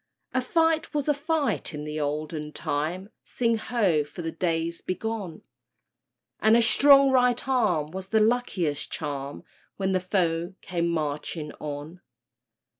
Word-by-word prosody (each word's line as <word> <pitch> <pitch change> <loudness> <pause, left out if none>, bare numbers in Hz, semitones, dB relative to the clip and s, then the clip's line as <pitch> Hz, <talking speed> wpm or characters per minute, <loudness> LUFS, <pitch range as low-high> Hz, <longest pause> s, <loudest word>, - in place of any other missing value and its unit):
A 255 - +2
fight 325 +2 +1
was 290 -1 0
a 295 - +4
fight 290 - -1
in 150 - -5
the 150 0 -4
olden 150 +1 -3
time— 175 +8 -3
Sing 230 -2 0
ho, 200 -10 +1
for 150 +4 -9
the 165 - -2
days 165 0 -1
bygone!— 195 -3 -4 1.0
And 220 +1 +5
a - - +5
strong 275 +3 +6
right 250 -1 +3
arm 185 - +1
was 190 +1 -6
the 220 +2 +2
luckiest 215 -10 0
charm, 140 0 -4 0.3
When 190 -1 0
the 185 - +2
foe 180 -1 -1
came 170 -2 -1
marching 150 -1 -3
on! 150 +4 -6
180 Hz, 140 wpm, -26 LUFS, 155-235 Hz, 1.0 s, strong